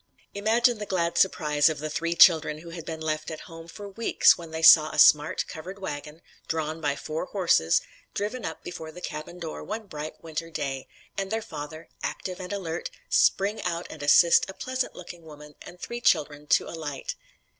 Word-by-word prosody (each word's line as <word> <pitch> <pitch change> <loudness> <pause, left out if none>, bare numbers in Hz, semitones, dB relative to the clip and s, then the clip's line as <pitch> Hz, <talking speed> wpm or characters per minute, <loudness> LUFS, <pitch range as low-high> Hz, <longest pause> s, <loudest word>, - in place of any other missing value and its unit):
Imagine 225 +3 +2
the 210 - -5
glad 170 -3 0
surprise 150 -5 +3
of 155 - -3
the 155 - -4
three 170 +2 -1
children 160 -3 +6
who 170 0 -10
had 165 -2 -8
been 160 -1 -5
left 155 -1 -2
at 160 - -7
home 165 -1 -11
for 200 +5 -9
weeks, 220 +4 +4
when 170 -1 -10
they 160 0 -5
saw 155 -1 +9
a - - -7
smart, 150 +1 +5
covered 185 +5 -8
wagon, 150 -4 -7 0.2
drawn 160 0 -3
by 145 -2 0
four 155 +4 -4
horses, 170 - +2 0.3
driven 215 +4 -3
up 160 - -6
before 160 -3 -7
the 180 - -11
cabin 155 0 -7
door 165 -3 -6
one 215 +1 -5
bright 155 -4 -7
winter 165 0 -5
day, 135 -4 -4 0.3
and 195 0 -3
their 225 - 0
father, 155 0 -8
active 185 -1 -4
and 185 0 -7
alert, 175 -5 -4 0.2
spring 200 +3 +2
out 175 -1 -2
and - - -9
assist 165 +6 +5
a 190 - -8
pleasant 255 0 -3
looking 175 -1 -10
woman 150 -2 -13
and 175 - -12
three 235 +4 -6
children 150 -7 +1
to - - +3
alight! 150 -4 -5
165 Hz, 190 wpm, -26 LUFS, 155-190 Hz, 0.3 s, saw